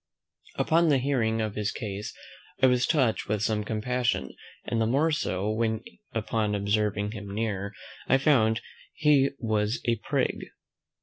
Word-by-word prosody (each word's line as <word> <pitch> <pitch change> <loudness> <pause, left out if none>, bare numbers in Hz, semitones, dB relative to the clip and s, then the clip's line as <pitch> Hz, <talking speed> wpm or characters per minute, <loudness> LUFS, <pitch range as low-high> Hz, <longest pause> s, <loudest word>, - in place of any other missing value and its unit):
Upon 165 +1 +3
the 140 - +5
hearing 120 -4 +1
of 110 -2 -2
his 105 0 -1
case, 105 -2 -5 0.5
I 130 - +5
was 125 -1 +3
touched 130 -8 +1
with 105 -1 0
some 105 -1 0
compassion, 115 - -1 0.3
and 115 - 0
the 110 - +2
more 145 +7 +2
so, 100 - -1
when, 110 0 0 0.3
upon 110 -2 -1
observing 105 0 0
him 105 -3 -7
nearer, 105 -2 -2 0.4
I 135 - +5
found 115 -6 +3 0.3
he 145 -3 +4
was 110 -1 0
a 115 -1 +2
prig. - - -1
110 Hz, 145 wpm, -27 LUFS, 105-125 Hz, 0.5 s, the